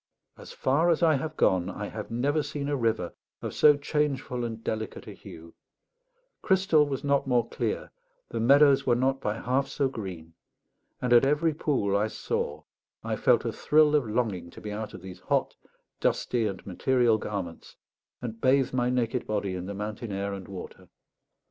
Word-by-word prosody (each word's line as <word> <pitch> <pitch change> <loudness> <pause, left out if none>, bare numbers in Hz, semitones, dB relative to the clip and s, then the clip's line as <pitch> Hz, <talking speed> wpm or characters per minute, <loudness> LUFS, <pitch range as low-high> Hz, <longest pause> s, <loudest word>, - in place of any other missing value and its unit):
As - - -12
far 150 +6 +2
as 170 +1 +2
I 160 -2 +5
have 155 +3 -5
gone, 90 -1 +2
I 100 +2 -5
have 105 - -7
never 140 +6 +1
seen 145 -1 -4
a 145 - +1
river 115 -8 -1 0.3
of - - -4
so 150 -1 +6
changeful 140 -4 -1
and 115 -1 -5
delicate 110 -1 -4
a - - -8
hue; 80 +1 -12 0.9
crystal 190 -6 +3
was 135 -2 -4
not 140 -1 +1
more 120 -3 +2
clear, - - -3 0.4
the - - -3
meadows 140 +3 +5
were 120 - +3
not 135 +2 +1
by 105 0 -1
half 130 +3 0
so 140 - 0
green; 90 -9 -7 0.7
and 125 -1 +2
at 120 - +7
every 150 +4 +2
pool 130 -10 0
I 105 +2 +2
saw 75 -8 -3 0.4
I - - -2
felt - - +3
a - - 0
thrill 150 0 +3
of 145 -6 +2
longing 105 -7 -1
to - - -12
be 105 - -6
out 105 +1 -5
of 90 - -11
these 95 -1 -9
hot, 90 - 0 0.4
dusty, 115 -3 +1
and 100 - -6
material 120 +3 +2
garments, 95 -6 -6 0.5
and 115 -2 -6
bathe 130 0 +3
my 125 -1 +1
naked 125 -1 -1
body 100 -3 -1
in 90 0 -5
the 100 - -5
mountain 105 +2 -5
air 100 +1 -2
and 95 -1 -7
water. 95 -2 -9
120 Hz, 180 wpm, -27 LUFS, 100-140 Hz, 0.9 s, at